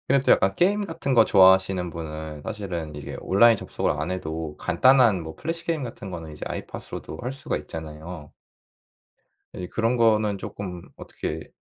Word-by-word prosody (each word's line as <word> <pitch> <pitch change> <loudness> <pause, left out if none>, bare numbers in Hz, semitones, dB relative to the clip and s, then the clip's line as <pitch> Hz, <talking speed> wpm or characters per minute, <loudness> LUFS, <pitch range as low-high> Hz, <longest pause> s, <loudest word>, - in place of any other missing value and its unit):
근데 135 0 +3
또 - - +6
약간 95 0 +3
게임 205 +3 +2
같은 140 -5 -2
거 115 -2 +7
좋아하시는 95 -2 +5
분은 80 -2 -7
사실은 90 -8 -5
이게 75 -1 -7
온라인 115 +4 +5
접속을 - - -2
안 80 +4 -3
해도 80 -4 -4
간단한 115 -1 +4
뭐 80 0 -8
플래시 165 +1 -4
게임 160 -6 -1
같은 105 -5 -7
거는 80 -3 -7
이제 75 - -13
아이팟으로도 80 - -7
할 125 +2 -3
수가 135 - -3
있잖아요. 80 0 -8 1.2
이제 90 - -6
그런 115 +2 0
거는 110 -3 +3
조금 90 -3 -6
어떻게 - - -6
95 Hz, 360 characters per minute, -25 LUFS, 80-115 Hz, 1.2 s, 거